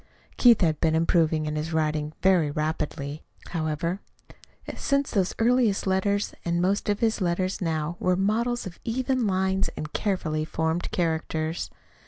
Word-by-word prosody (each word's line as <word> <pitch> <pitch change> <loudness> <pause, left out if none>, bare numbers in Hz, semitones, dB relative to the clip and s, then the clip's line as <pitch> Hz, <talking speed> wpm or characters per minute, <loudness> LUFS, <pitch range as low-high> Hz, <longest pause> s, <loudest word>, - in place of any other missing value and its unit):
Keith 235 -4 +6
had 160 -4 +2
been 160 -1 +3
improving 160 -1 +2
in 150 0 -2
his 155 +2 -3
writing 155 -1 0
very 180 -5 +4
rapidly, 150 -1 -3 0.3
however, 165 +3 -2 0.7
since 280 0 0
those 190 -4 0
earliest 230 -3 +2
letters, 200 +2 +1
and 170 0 0
most 195 +4 +1
of 205 - 0
his 225 -2 +1
letters 185 +2 0
now 165 0 -1
were 180 0 +2
models 225 +6 0
of 180 -3 -8
even 255 0 0
lines 190 0 +1
and 155 0 -5
carefully 170 -7 -1
formed 160 +2 -1
characters. 160 -1 -1
175 Hz, 145 wpm, -26 LUFS, 155-200 Hz, 0.7 s, Keith